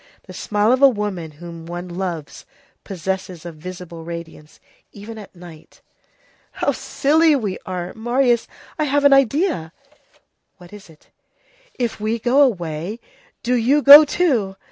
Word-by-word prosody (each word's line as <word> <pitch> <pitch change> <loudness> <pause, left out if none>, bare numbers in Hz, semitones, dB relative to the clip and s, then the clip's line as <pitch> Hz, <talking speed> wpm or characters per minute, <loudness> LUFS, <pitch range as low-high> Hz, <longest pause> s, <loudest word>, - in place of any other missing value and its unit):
The - - -12
smile 210 +2 0
of 260 +1 +1
a 275 - +8
woman 205 -8 -4
whom 165 +1 -11
one 175 +1 -6
loves 175 -4 -6 0.4
possesses 185 -2 -5
a 170 - -6
visible 170 +1 -10
radiance, 165 -2 -10 0.3
even 220 +2 -10
at 205 - -13
night. 170 -3 -15 0.7
"How - - 0
silly 310 +2 +2
we 210 -8 -3
are! 180 -1 -5
Marius, 240 +1 0 0.3
I 305 - +1
have 285 0 +1
an 285 - +7
idea." 275 - +1 0.9
"What 180 0 -16
is 205 -4 -13
it?" 155 -2 -21 0.7
"If 235 -3 -3
we 215 +2 -1
go 245 +5 +2
away, 180 - -1 0.4
do 250 - 0
you 255 +5 +2
go 290 +2 +11
too! 260 - 0
205 Hz, 145 wpm, -20 LUFS, 175-255 Hz, 0.9 s, go